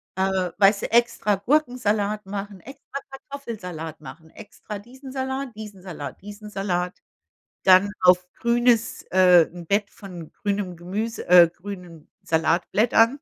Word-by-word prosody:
Äh, 190 Hz, -2 st, 0 dB
weißt 200 Hz, 0 st, +4 dB
du, -, -, -4 dB
extra 235 Hz, -3 st, +2 dB
Gurkensalat 215 Hz, -4 st, 0 dB
machen, 200 Hz, -1 st, -6 dB
extra 275 Hz, +3 st, -9 dB
Kartoffelsalat 210 Hz, -, -8 dB
machen, 160 Hz, +4 st, -12 dB
extra 210 Hz, +1 st, -9 dB
diesen 260 Hz, +5 st, -12 dB
Salat, 265 Hz, -2 st, -4 dB
diesen 210 Hz, -3 st, -9 dB
Salat, 180 Hz, -2 st, -8 dB
diesen 205 Hz, +1 st, -10 dB
Salat, 180 Hz, -3 st, -2 dB, 0.6 s
dann 190 Hz, +2 st, +6 dB
auf 180 Hz, 0 st, +5 dB
grünes 235 Hz, -1 st, +2 dB
äh, 180 Hz, -3 st, +6 dB
'n 175 Hz, -2 st, -10 dB
Bett 200 Hz, +1 st, 0 dB
von 175 Hz, -5 st, -10 dB
grünem 200 Hz, -4 st, -3 dB
Gemüse, 205 Hz, +7 st, -4 dB
äh, 175 Hz, -1 st, +8 dB
grünen 180 Hz, -4 st, -10 dB
Salatblättern. 210 Hz, +8 st, +2 dB
200 Hz, 125 wpm, -24 LUFS, 180-230 Hz, 0.6 s, äh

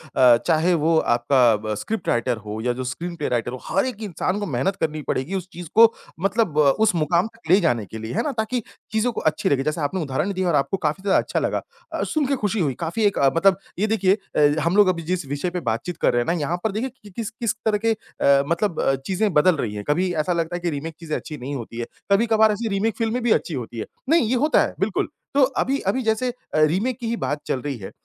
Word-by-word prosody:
अ, 125 Hz, -2 st, +7 dB
चाहे 165 Hz, +3 st, +3 dB
वो 160 Hz, 0 st, +2 dB, 0.2 s
आपका 120 Hz, -1 st, +4 dB
ब 110 Hz, -, -1 dB
स्क्रिप्ट 200 Hz, -, -4 dB
राइटर 120 Hz, 0 st, +1 dB
हो 105 Hz, 0 st, -6 dB
या 125 Hz, +1 st, 0 dB
जो 130 Hz, -, -5 dB
स्क्रीन 170 Hz, +8 st, -5 dB
पे 150 Hz, -3 st, -3 dB
राइटर 120 Hz, -1 st, -1 dB
हो, 130 Hz, -, -6 dB
हर 195 Hz, +6 st, +1 dB
एक 245 Hz, -4 st, -5 dB
इंसान 190 Hz, 0 st, -2 dB
को 205 Hz, -, -2 dB
मेहनत 155 Hz, +4 st, -1 dB
करनी 155 Hz, -1 st, -1 dB
पड़ेगी 145 Hz, +9 st, -1 dB
उस 185 Hz, -2 st, -4 dB
चीज़ 175 Hz, 0 st, -8 dB
को 230 Hz, +1 st, +7 dB, 0.3 s
मतलब 195 Hz, -4 st, +1 dB
अ, 145 Hz, -2 st, +6 dB
उस 215 Hz, +5 st, +2 dB
मुकाम 170 Hz, +4 st, +2 dB
तक 225 Hz, -7 st, -16 dB
ले 190 Hz, -, +7 dB
जाने 120 Hz, -10 st, +1 dB
के 110 Hz, -, -9 dB
लिए। 110 Hz, +2 st, -6 dB
है -, -, +1 dB
ना? 300 Hz, -, -1 dB
ताकि 220 Hz, +2 st, -1 dB, 0.3 s
चीज़ों 220 Hz, +3 st, +1 dB
को -, -, -4 dB
अच्छी 155 Hz, -, +1 dB
लगे, 135 Hz, -1 st, +2 dB
जैसे 155 Hz, +2 st, -2 dB
आपने 160 Hz, +6 st, -1 dB
उदाहरण 155 Hz, +6 st, -1 dB
दिया 185 Hz, -1 st, -1 dB
और 170 Hz, -, +2 dB
आपको 145 Hz, +7 st, +1 dB
काफ़ी 155 Hz, +6 st, -2 dB
ज़्यादा 200 Hz, -, +3 dB
अच्छा -, -, -1 dB
लगा। -, -, -1 dB, 0.3 s
अ, -, -, -1 dB
सुनके 285 Hz, -3 st, 0 dB
खुशी 210 Hz, +1 st, 0 dB
हुई 145 Hz, -7 st, +1 dB
काफ़ी 170 Hz, +6 st, -2 dB
एक 200 Hz, -, +2 dB
अ, 140 Hz, -, +5 dB
मतलब 190 Hz, +2 st, +4 dB, 0.2 s
ये 215 Hz, -, +2 dB
देखिए 200 Hz, -2 st, +2 dB, 0.2 s
अ, -, -, +2 dB, 0.2 s
हम 170 Hz, +3 st, +1 dB
लोग 205 Hz, -2 st, +7 dB
अभी 175 Hz, -2 st, +1 dB
जिस 180 Hz, 0 st, -2 dB
विषय 145 Hz, +6 st, -2 dB
पे 180 Hz, -, -3 dB
बातचीत 140 Hz, +10 st, -3 dB
कर -, -, +3 dB
रहे 120 Hz, -, +2 dB
हैं -, -, -2 dB
ना 170 Hz, -, +2 dB
यहाँ 155 Hz, +4 st, -1 dB
पर 220 Hz, -, +1 dB
देखिए 225 Hz, +6 st, -2 dB
कि 205 Hz, -, -12 dB
किस-किस 225 Hz, +2 st, -3 dB
तरह 215 Hz, -1 st, +3 dB
के 225 Hz, -, +4 dB
अ, 140 Hz, -9 st, +1 dB
मतलब 170 Hz, +2 st, 0 dB
अ, 135 Hz, -, +2 dB
चीज़ें 195 Hz, +2 st, 0 dB
बदल 160 Hz, +4 st, +5 dB
रही 115 Hz, -8 st, -3 dB
हैं, 105 Hz, -, -5 dB
कभी 180 Hz, +5 st, +1 dB
ऐसा 160 Hz, +2 st, 0 dB
लगता 170 Hz, 0 st, -1 dB
है -, -, -3 dB
कि 175 Hz, 0 st, -1 dB
रीमेक 160 Hz, +1 st, -5 dB
चीज़ 160 Hz, -2 st, -6 dB
अच्छी 150 Hz, -1 st, -4 dB
नहीं 135 Hz, +3 st, -5 dB
होती 115 Hz, -2 st, -7 dB
है। 120 Hz, -, -2 dB, 0.3 s
कभी-कभार 220 Hz, +1 st, +4 dB
ऐसी 210 Hz, +2 st, -3 dB
रीमेक 205 Hz, +2 st, 0 dB
फ़िल्म 225 Hz, +1 st, 0 dB
भी 240 Hz, -1 st, +1 dB
अच्छी 170 Hz, -, +1 dB
होती 120 Hz, -3 st, -5 dB
है। -, -, -3 dB, 0.2 s
नहीं, 330 Hz, +2 st, +5 dB
ये 255 Hz, -, +2 dB
होता 295 Hz, +5 st, +3 dB
है -, -, -1 dB
बिल्कुल 195 Hz, +2 st, 0 dB, 0.3 s
तो 280 Hz, -, +3 dB, 0.2 s
अभी 275 Hz, +1 st, 0 dB
अभी 260 Hz, -, 0 dB
जैसे 220 Hz, +3 st, +1 dB
अ, -, -, -4 dB, 0.2 s
रीमेक 185 Hz, +11 st, +2 dB
की 235 Hz, -, -4 dB
ही 235 Hz, -, 0 dB
बात 145 Hz, -7 st, -2 dB
चल 130 Hz, -, -1 dB
रही 145 Hz, -3 st, -4 dB
है 95 Hz, -4 st, -8 dB
175 Hz, 260 wpm, -23 LUFS, 140-215 Hz, 0.3 s, अ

